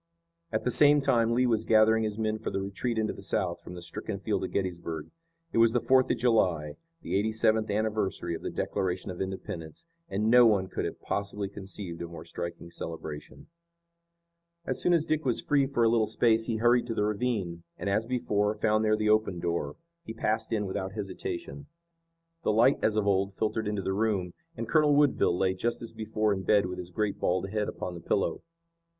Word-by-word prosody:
At 110 - -1
the 125 - +1
same 145 +4 +6
time 120 -5 +2
Lee 125 +1 +3
was 115 -3 +1
gathering 110 0 +4
his 105 -1 -3
men 110 -1 -1
for - - -3
the - - -2
retreat 100 +5 -3
into 110 -1 0
the - - -11
South 95 -5 -1
from 90 - -9
the 90 - -8
stricken 85 - -5
field - - -1
of - - -2
Gettysburg. 85 -5 -3 0.4
It - - +2
was 115 0 +5
the 120 - +3
Fourth 130 +1 +3
of - - +1
July, 90 -11 +1 0.3
the - - -2
eighty 105 +3 +1
seventh 110 0 +2
anniversary 105 -4 -1
of 80 - -5
the - - -3
Declaration 95 +1 -2
of 90 - -6
Independence, 95 -4 -6 0.2
and 105 +3 0
no 125 -1 +8
one 95 -4 +2
could - - -3
have - - -5
possibly 100 0 -3
conceived 95 -3 -7
a 85 - -4
more 85 -1 -10
striking 85 0 -6
celebration. 80 -3 -7 1.2
As - - -2
soon 180 - +3
as 165 -2 +3
Dick 155 -1 0
was 125 -3 0
free 140 -2 +2
for 125 -4 +1
a - - +5
little 115 -1 +3
space 115 0 +2
he 115 - 0
hurried 120 +2 +3
to 115 - -3
the 105 - +1
ravine, 105 -6 -2 0.2
and, - - -5
as 105 +3 +1
before, 105 -4 0
found 110 +1 +2
there 110 0 +3
the 110 0 0
open 105 -4 +2
door. 85 -4 -2 0.3
He 110 - -7
passed 110 +1 -1
in 105 -2 0
without 95 0 -4
hesitation. 145 - -5 0.7
The - - +1
light 120 +6 +4
as 110 - +2
of 105 -1 +1
old 100 0 +1
filtered 110 +1 -1
into 105 -2 -2
the 95 - -1
room, 100 -4 0 0.2
and 115 - -4
Colonel 150 +1 +4
Woodville 140 -11 +3
lay 95 0 +2
just 115 +6 -2
as 115 - -7
before 110 -1 0
in 95 - -3
bed 100 +1 +3
with 90 0 -5
his 90 -1 -7
great 105 +2 -2
bald 95 +2 0
head 105 -1 -1
upon 90 - -5
the 85 - -8
pillow. 100 +3 0
105 Hz, 210 wpm, -29 LUFS, 95-115 Hz, 1.2 s, no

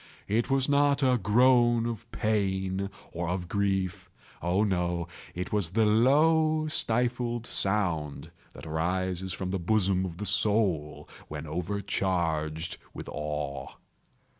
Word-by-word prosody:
It 115 +6 0
was 135 -1 +2
not 145 0 +3
a 125 -2 +3
groan 120 +2 +4
of 115 0 -5
pain 95 -2 -1 0.2
or 85 0 -3
of 90 -1 -2
grief—oh, 95 -1 -2
no!—it 90 -1 -3
was 100 -5 +1
the 110 +4 +2
low 155 +8 +4
stifled 120 -3 0
sound 90 - -1 0.2
that - - -11
arises 90 +3 -1
from 90 0 -4
the 95 - -1
bottom 95 0 +2
of 85 -3 -5
the 105 - -4
soul 100 -7 +1 0.2
when 75 0 -6
overcharged 85 -2 -1 0.2
with - - -7
awe. 75 -2 -4
95 Hz, 115 wpm, -28 LUFS, 85-115 Hz, 0.2 s, groan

